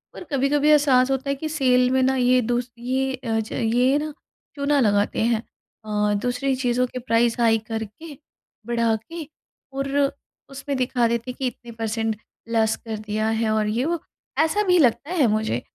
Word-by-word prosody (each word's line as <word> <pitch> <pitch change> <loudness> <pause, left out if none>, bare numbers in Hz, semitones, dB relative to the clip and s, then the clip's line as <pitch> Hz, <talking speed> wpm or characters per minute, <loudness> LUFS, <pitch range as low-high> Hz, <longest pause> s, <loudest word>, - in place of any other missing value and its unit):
और - - -8
कभी-कभी 280 +2 +2
एहसास 275 -4 +5
होता 270 +1 -1
है 275 - +1
कि 310 +3 -5
सेल 255 -4 +3
में 260 0 +3
ना 265 +1 +2
ये 255 0 +3
दूस 240 +1 -2
ये 260 +2 -1
अ, 230 -4 -2
ज 220 - -5
ये 245 +4 +2
ना 305 0 -4 0.4
चूना 285 0 +1
लगाते 205 -4 +2
हैं। 230 0 +1 0.4
अ, 210 -1 0
दूसरी 250 +2 0
चीज़ों 250 -1 +1
के 255 - -6
प्राइस 235 -1 +1
हाई 225 -1 +4
कर 225 -1 -3
के 290 +8 -12 0.5
बढ़ा 230 -1 +1
के 325 +10 -7 0.5
और 275 0 -2 0.6
उसमें 275 +1 -4
दिखा 250 -2 +1
देते 235 +2 -2
हैं - - -12
कि 265 - 0
इतने 240 0 -8
परसेंट 225 0 -1 0.4
लेस 220 -1 +2
कर 220 -1 -4
दिया 215 +1 -2
है 225 -1 +1
और 215 -1 +1
ये 230 +5 0
वो 340 +1 -1 0.4
ऐसा 320 +7 +2
भी 360 0 +5
लगता 280 +3 +2
है 315 -9 +3
मुझे। 215 - 0
250 Hz, 185 wpm, -23 LUFS, 225-275 Hz, 0.6 s, एहसास